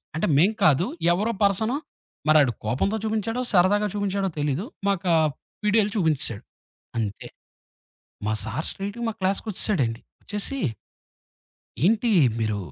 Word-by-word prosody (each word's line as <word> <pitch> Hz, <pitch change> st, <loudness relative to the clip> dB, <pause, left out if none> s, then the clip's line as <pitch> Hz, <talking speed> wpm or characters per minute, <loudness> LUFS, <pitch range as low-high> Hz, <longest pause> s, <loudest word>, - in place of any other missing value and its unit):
అంటే 160 Hz, -, 0 dB
మేం 185 Hz, +7 st, +5 dB
కాదు 155 Hz, +3 st, +5 dB, 0.3 s
ఎవరో 210 Hz, +6 st, 0 dB
పర్సను, 220 Hz, +6 st, +2 dB, 0.5 s
మరాడు 150 Hz, -5 st, +6 dB
కోపంతో 140 Hz, -, 0 dB
చూపించాడో, 220 Hz, +2 st, -1 dB
సరదాగా 205 Hz, +3 st, +4 dB
చూపించాడో 200 Hz, -1 st, -1 dB
తెలీదు. 145 Hz, +6 st, -1 dB, 0.2 s
మాకా 185 Hz, -3 st, +1 dB, 0.5 s
వీడియోలు 210 Hz, 0 st, +3 dB
చూపించేసాడు. 150 Hz, -, 0 dB, 0.5 s
అంతే 105 Hz, -3 st, -3 dB, 1.0 s
మా 110 Hz, -, +1 dB
సారు 110 Hz, +9 st, -3 dB
స్ట్రెయిట్‌గా 200 Hz, +4 st, -5 dB
మా -, -, -4 dB
క్లాస్‌కొచ్చేసాడండి. 185 Hz, -, 0 dB, 0.2 s
వచ్చేసి 210 Hz, +6 st, -3 dB, 1.2 s
ఏంటి 225 Hz, +4 st, +3 dB, 0.3 s
మీరు 110 Hz, -2 st, 0 dB
195 Hz, 110 wpm, -25 LUFS, 150-210 Hz, 1.2 s, మరాడు